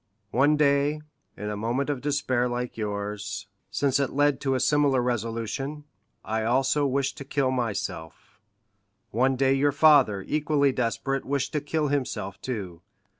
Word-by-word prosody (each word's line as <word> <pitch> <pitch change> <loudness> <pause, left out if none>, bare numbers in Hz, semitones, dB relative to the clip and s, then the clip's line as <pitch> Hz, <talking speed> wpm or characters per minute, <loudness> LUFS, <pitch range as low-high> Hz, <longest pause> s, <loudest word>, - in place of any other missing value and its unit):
One 145 +4 +3
day, 145 +1 +2 0.4
in 105 +1 -4
a - - -3
moment 120 +7 -1
of 135 -3 -4
despair 130 -4 0
like 120 0 -3
yours, 100 -2 -4 0.2
since 140 -1 +1
it 140 - +1
led 145 -1 +1
to 135 -2 +1
a - - 0
similar 140 0 +3
resolution, 120 +4 -3 0.4
I 110 +1 -1
also 135 +5 +2
wished 135 0 -1
to - - -5
kill 135 -1 0
myself; 100 -10 -4 0.7
one 130 +4 +2
day 135 +1 +3
your 140 +1 +2
father, 140 -9 +4
equally 145 -2 +2
desperate, 130 +2 -1
wished 140 0 -2
to 150 - 0
kill 150 0 -1
himself 125 -8 -3
too. 95 -9 -5
130 Hz, 150 wpm, -26 LUFS, 115-145 Hz, 0.7 s, father